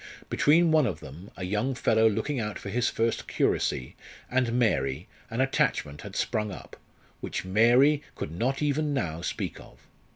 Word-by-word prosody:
Between 160 +3 +4
one 155 -4 +4
of 90 -8 -3
them, 80 +9 -11
a 90 - -4
young 105 +8 -1
fellow 110 -2 +3
looking 110 +6 -2
out 105 -2 -3
for 100 - -7
his 120 +4 +1
first 115 0 -1
curacy, 65 - 0 0.4
and 125 -2 +1
Mary 80 - +1 0.2
an 115 +2 -1
attachment 75 - 0
had - - -9
sprung 105 -1 -1
up, - - -10 0.4
which - - -4
Mary 120 +9 +4
could - - -5
not 130 - -1
even 150 0 0
now 85 -10 -2
speak 90 - -4
of. - - -15
115 Hz, 165 wpm, -27 LUFS, 95-135 Hz, 0.4 s, Between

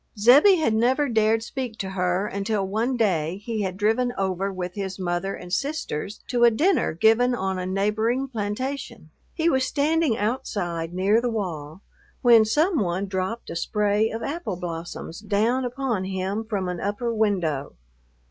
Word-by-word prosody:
Zebbie 270 - +7
had 315 -10 +1
never 255 +6 +2
dared 225 -1 +2
speak 245 -2 -5
to 190 -2 -4
her 180 0 0
until 200 0 -1
one 230 +6 -1
day 180 -6 +1
he 225 -2 -2
had 190 -2 -3
driven 225 +4 +1
over 195 0 -1
with 180 -1 -5
his 190 -2 -4
mother 180 +1 -2
and 180 0 -9
sisters 275 - -3
to 245 -1 +2
a 240 - +8
dinner 320 - +2
given 225 +8 +3
on 190 -4 -2
a 180 - -3
neighboring 220 +7 0
plantation. 230 - -4 0.2
He 330 -1 +1
was 265 -6 +3
standing 290 -2 +1
outside 200 -8 -2
near 195 +5 +2
the 245 - 0
wall, 175 -6 -5 0.4
when 230 -3 +7
some 310 - +2
one 185 0 -1
dropped 190 +4 -3
a - - -5
spray 210 +4 +1
of 225 +1 -5
apple 290 - -3
blossoms 170 -1 -6
down 220 +5 +1
upon 245 -6 -2
him 190 +3 -3
from 200 -4 -2
an 180 -1 -3
upper 220 +4 -2
window. 180 -10 0
210 Hz, 165 wpm, -24 LUFS, 185-245 Hz, 0.4 s, a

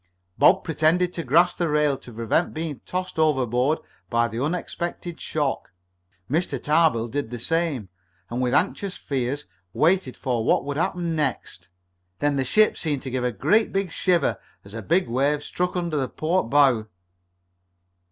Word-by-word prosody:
Bob - - +5
pretended 165 +3 +2
to 170 - -4
grasp 170 +7 +3
the 170 -2 +1
rail 150 -1 +2
to 125 - -12
prevent 115 +9 0
being 155 -3 -4
tossed 185 -2 -3
overboard 135 -1 +2 0.3
by 115 0 +2
the 115 +3 -3
expected 175 0 -6
shock. 145 -3 -2 0.6
Mr. 165 - -1
Tarbill 150 -7 +2
did 140 0 -3
the 120 - -5
same, 155 - -1 0.4
and 120 +4 -3
with 125 -1 +1
anxious 195 +5 0
fears 135 +1 -3 0.3
waited 165 -4 +2
for 120 -3 -1
what - - +2
would 145 0 -3
happen 170 0 -1
next. 140 -10 -3 0.5
Then 145 -1 +1
the 135 - +1
ship 215 - +3
seemed 145 -4 -2
to 130 - -5
give 125 0 -1
a 125 - +1
great 195 - +1
shiver 175 -5 +1 0.3
as 100 - -13
a 115 - -5
big 175 - +1
wave 140 +5 +1
struck 180 +4 -2
under 170 -3 -1
the 130 -3 -1
port 160 -4 -1
bow. 130 -6 +4
150 Hz, 160 wpm, -24 LUFS, 125-170 Hz, 0.6 s, Bob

